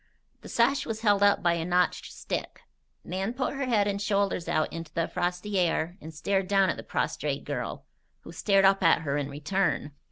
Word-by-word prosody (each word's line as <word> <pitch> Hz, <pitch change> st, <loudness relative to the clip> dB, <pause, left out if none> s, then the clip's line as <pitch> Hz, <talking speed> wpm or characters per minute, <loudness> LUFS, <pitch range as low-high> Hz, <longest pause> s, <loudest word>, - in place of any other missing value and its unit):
The -, -, -11 dB
sash 265 Hz, +4 st, +2 dB
was 220 Hz, -1 st, -4 dB
held 205 Hz, -3 st, +3 dB
up 200 Hz, -2 st, +4 dB
by 175 Hz, -1 st, +4 dB
a 170 Hz, -1 st, -2 dB
notched 180 Hz, +1 st, 0 dB
stick. -, -, -5 dB, 0.4 s
Nan 190 Hz, +5 st, -3 dB
put 260 Hz, +1 st, -1 dB
her 275 Hz, -1 st, -3 dB
head 210 Hz, -4 st, +2 dB
and 200 Hz, 0 st, -2 dB
shoulders 200 Hz, -4 st, 0 dB
out 155 Hz, -, 0 dB
into 165 Hz, -1 st, -7 dB
the 165 Hz, -1 st, 0 dB
frosty 180 Hz, +3 st, -2 dB
air 170 Hz, -1 st, 0 dB
and 160 Hz, -, -8 dB
stared 190 Hz, +4 st, -1 dB
down 195 Hz, -1 st, +3 dB
at -, -, -6 dB
the -, -, -6 dB
prostrate -, -, -2 dB
girl, -, -, -4 dB, 0.4 s
who -, -, -11 dB
stared 195 Hz, -2 st, +3 dB
up 195 Hz, 0 st, +4 dB
at 165 Hz, -1 st, +4 dB
her 140 Hz, -2 st, -1 dB
in 145 Hz, -1 st, -2 dB
return. 150 Hz, 0 st, -1 dB
190 Hz, 200 wpm, -28 LUFS, 165-205 Hz, 0.4 s, up